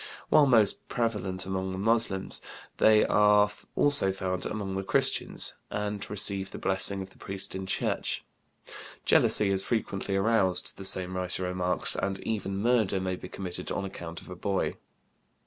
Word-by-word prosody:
While 150 -2 +5
most 110 -6 +2
prevalent 100 -6 -2
among 95 0 -3
the - - -5
Moslems, 105 -2 +3 0.4
they 110 -1 +5
are 105 0 +4 0.3
also 145 -9 +4
found 95 -1 -3
among 100 -3 -4
the 95 - -3
Christians, - - +1 0.2
and 105 -1 -3
receive 100 -1 0
the - - -8
blessing 95 0 +1
of 95 - -13
the - - -22
priest 95 0 -2
in 95 0 -6
church. - - -1 0.8
Jealousy 105 -2 +4
is 95 -1 +3
frequently 100 -3 -2
aroused, 95 -2 +1
the 95 - -7
same 95 -1 +5
writer 90 0 -3
remarks, 90 0 -1
and 100 -1 -2
even 100 -3 -3
murder 110 -3 +1
may 95 0 -2
be 90 - -10
committed 90 -2 -7
on 100 - -3
account 85 -3 -8
of - - -13
a - - -6
boy. 100 +1 -2
95 Hz, 160 wpm, -28 LUFS, 95-105 Hz, 0.8 s, While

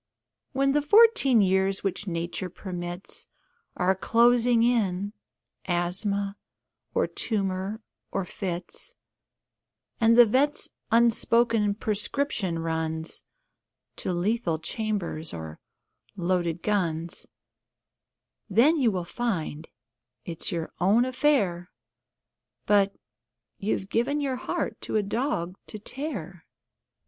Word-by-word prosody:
When 275 0 +2
the 295 +1 +3
fourteen 355 - +6
years 190 0 +2
which 195 +1 -2
Nature 170 +1 -3
permits 175 0 -6 0.5
Are 185 +1 +3
closing 235 +3 +4
in 205 -4 +1 0.5
asthma, 195 +3 -1 0.6
or - - +3
tumour, 200 0 -2 0.3
or 195 -1 -1
fits, 180 - -5 1.0
And 230 +1 +5
the 240 - +10
vet's 275 +7 +1 0.2
unspoken 230 -2 +3
prescription 210 -3 -1
runs 160 0 -3 0.8
To - - -2
lethal 180 -1 0
chambers 175 -3 -3
or 80 -1 -7 0.6
loaded 175 -2 -1
guns, 170 -5 -1 1.2
Then 250 - +5
you 255 -6 +3
will 180 -4 -2
find 170 -8 -3 0.6
it's 165 -2 -5
your 165 -2 -3
own 210 +7 +4
affair 250 -10 +1 1.0
But...you've 195 - -2
given 250 +8 0
your 270 -3 -1
heart - - -3
for - - -1
a 210 - +2
dog 200 - -2
to 215 - -7
tear. 205 - -6
200 Hz, 95 wpm, -27 LUFS, 175-235 Hz, 1.2 s, the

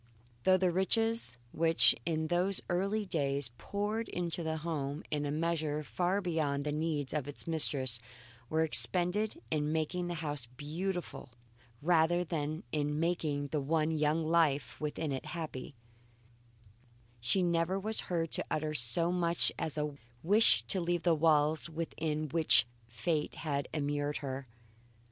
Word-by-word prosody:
Though 185 0 +5
the 185 -1 +1
riches, 225 - +1
which 165 0 +4
in 160 -1 -1
those 180 +3 +3
early 200 +4 0
days 140 -7 -1
poured 210 +2 -3
into 175 0 -3
the 160 -1 -2
home 150 -2 -4
in 150 -1 -1
a - - -2
measure 155 -1 -1
far 180 +6 -1
beyond 155 -6 -1
the 150 - -2
needs 150 -2 -2
of 150 -3 -2
its 145 - -6
mistress, 135 -7 +2 0.5
were 160 +1 +1
expended 185 - +4
in 150 -1 0
making 160 +3 -2
the 175 - -3
house 145 -6 -3
beautiful 155 +5 -5 0.5
rather 175 +1 +3
than 155 -2 -4
in 150 0 -1
making 155 -4 -1
the 150 0 -1
one 155 +2 0
young 155 +1 0
life 155 -4 +1
within 150 0 -3
it 135 - -4
happy, 145 -4 -6 1.4
she 155 +11 +2
never 170 +2 0
was 215 +3 +2
heard 165 -3 -1
to - - +1
utter 155 0 -2
so 155 +7 +4
much 170 -1 +3
as 155 - -2
a 150 -1 -2 0.3
wish 205 +7 +5
to 190 - -1
leave 175 0 -1
the 175 - +3
walls 155 0 +2
within 155 -1 -3
which 120 -8 +4 0.2
fate 150 +7 -2
had 140 -3 -3
immured 145 -1 -2
her. 135 -2 -6
160 Hz, 145 wpm, -32 LUFS, 145-175 Hz, 1.4 s, Though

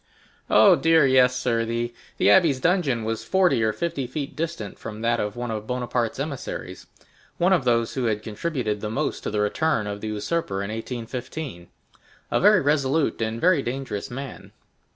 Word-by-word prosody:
"Oh - - +7
dear, 165 -2 +4
yes, 130 -1 +4
sir; 120 -2 0
the 115 +1 -2 0.3
abbé's 165 -8 +5
dungeon 150 -8 +1
was 110 0 -3
forty 180 -10 +2
or 110 - +2
fifty 160 -1 -3
feet 140 +3 -5
distant 155 - -4
from 105 0 -7
that 115 0 +1
of 105 0 -2
one 120 -1 -4
of 110 -1 -5
Bonaparte's 125 -1 -2
emissaries,—one 155 +5 -4
of 160 -8 +1
those 115 -2 +2
who 130 -2 -1
had 110 -2 -1
contributed 110 -2 -3
the 105 - -3
most 110 - -2
to - - -3
the 105 0 -1
return 110 +2 +1
of 100 0 -5
the 110 - -4
usurper 105 -1 -2
in 100 - -4
1815, 120 - -6 0.6
a - - +2
very 205 0 +6
resolute 145 -1 +1
and 110 +1 -2
very 175 -2 +4
dangerous 125 -5 -4
man." 135 +2 -8
125 Hz, 170 wpm, -24 LUFS, 110-150 Hz, 0.6 s, Oh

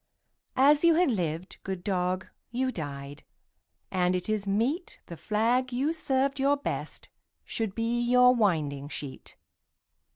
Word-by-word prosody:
As 290 +3 +5
you 335 -1 +6
had 350 -4 +3
lived, 175 -3 -3
good 190 -2 -5
dog, 185 -1 -1 0.2
you 255 +2 -1
died, 145 - -6 0.7
And 180 -1 +2
it 180 - -3
is 210 -2 -1
meet 240 - -1
The 170 - -8
flag 235 +7 +1
you 270 +6 0
served 275 -3 0
your 280 +1 +3
best 285 - -5 0.4
should 220 -4 -3
be 230 +1 0
Your 250 +1 +5
winding 155 - 0
sheet. 140 -3 -8
220 Hz, 135 wpm, -28 LUFS, 180-260 Hz, 0.7 s, you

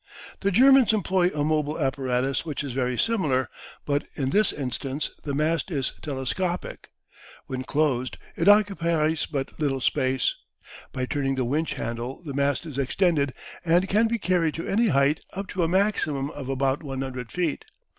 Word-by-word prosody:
The 200 - +1
Germans 260 +3 +6
employ 190 -4 +2
a 150 -4 -2
mobile 150 0 0
apparatus 135 -2 0
which 150 -3 -4
is 140 - -4
very 125 -1 -1
similar, 155 - +1 0.3
but 145 0 0
in 135 -2 -1
this 210 +1 +3
instance 135 +2 -3
the 140 -2 -3
mast 160 +5 0
is 140 -6 -1
telescopic. 155 +6 -3 0.6
When 130 -1 -4
closed 130 -2 0 0.2
it 165 - 0
occupies 170 -7 +3
but 140 -1 -4
little 140 -3 0
space. 130 0 +1 0.6
By 130 - -2
turning 135 -1 -1
the 130 -2 0
winch 150 +6 -1
handle 120 +6 -5
the 145 -4 -6
mast 140 +4 0
is 145 -4 -5
extended, 145 -1 +1 0.3
and 175 +3 +3
can 215 +4 +3
be 230 +1 0
carried 180 -6 +1
to 165 - -5
any 225 +4 +2
height 140 -2 +2
up 195 +1 -4
to 185 - -2
a 165 - +3
maximum 160 -7 +1
of 135 -3 -7
about 135 +1 0
100 130 -4 -5
feet. 175 -5 -2
150 Hz, 165 wpm, -25 LUFS, 135-175 Hz, 0.6 s, Germans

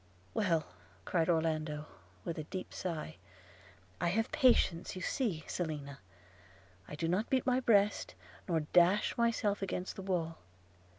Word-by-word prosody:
'Well,' 170 -8 +1 0.4
cried 165 -2 +1
Orlando, 155 -2 0 0.4
with 165 - -3
a - - -3
deep 185 +3 -6
sigh, 160 -3 -4 0.8
'I 175 - +2
have 225 +6 +1
patience, 240 - +3
you 185 - -6
see, 195 - -1
Selina 145 -5 -4 0.4
– 95 0 -26
I - - -6
do 165 +2 -1
not 185 +7 0
beat 260 -2 +2
my 255 0 +3
breast, 210 - +3 0.3
nor 165 -3 +1
dash 175 +6 +4
myself 230 -4 +1
against 185 -1 -3
the - - -6
wall. 175 -4 -2
175 Hz, 140 wpm, -33 LUFS, 155-205 Hz, 0.8 s, dash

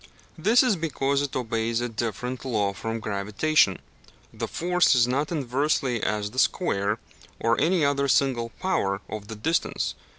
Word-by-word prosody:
This 220 - +4
is 245 -5 +3
because 140 -4 0
it 145 -2 -3
obeys 115 -2 -1
a 120 - -1
different 120 +2 -4
law 105 -6 0
from 115 +3 -4
gravitation 105 +3 +1 0.6
the - - -4
force 180 -2 +2
is 120 -1 +4
not 140 +5 -1
inversely 135 -4 0
as 105 -1 -1
the 130 - -3
square, 105 - +1 0.4
or 115 +1 +1
any 170 -2 +3
other 140 0 +1
single 130 -4 +2
power, 100 - 0
of 105 -2 -7
the 110 - -7
distance. 160 +11 -1
125 Hz, 155 wpm, -25 LUFS, 110-150 Hz, 0.6 s, This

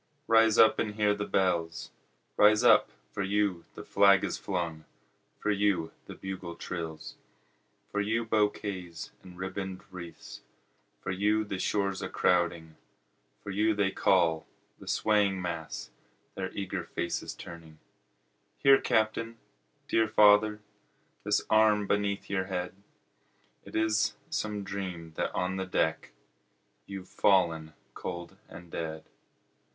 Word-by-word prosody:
rise 115 -2 +5
up 110 - +6
and 105 -1 -1
hear 105 -1 +3
the 105 0 -4
bells; 85 -4 0 0.4
Rise 105 +2 +5
up - - +6 0.2
for - - -4
you 100 -3 0
the - - -8
flag 100 -1 +5
is - - -1
flung 85 -5 -3 0.5
for 105 - -1
you 100 -5 +1 0.2
the - - -8
bugle 95 -3 -6
trills, 80 -3 -6 0.7
For 105 - 0
you 115 +3 0
bouquets 105 -5 -2
and 90 -1 -13
ribbon'd 95 0 -5
wreaths 90 -2 -9 0.6
for - - -3
you 105 +3 +2
the 100 -2 -4
shores 100 0 0
a - - -4
crowding, 85 -3 +1 0.7
For 100 - -5
you 105 +2 +2
they 100 -1 +1
call, 85 -5 +2 0.3
the - - -13
swaying 105 -3 +2
mass, 85 -8 -5 0.4
their 95 -1 -4
eager 100 -2 -4
faces 85 - -4
turning; 85 -2 -11 0.8
Here 135 0 +6
Captain! 115 +1 0 0.5
dear 110 -1 +2
father! 105 0 +5 0.6
The - - +2
arm 110 -1 +4
beneath 100 0 -1
your 95 -2 -1
head! 90 -2 -3 0.9
It - - -11
is 110 -1 +2 0.2
some 105 -1 -2
dream 95 -5 -6
that - - -1
on 90 +1 -1
the 95 - -2
deck, 80 -3 0 0.8
You've 95 -2 -7
fallen 85 -7 +2 0.2
cold 85 0 -6
and 85 -1 -12
dead. 80 -1 -5
95 Hz, 130 wpm, -29 LUFS, 85-105 Hz, 0.9 s, up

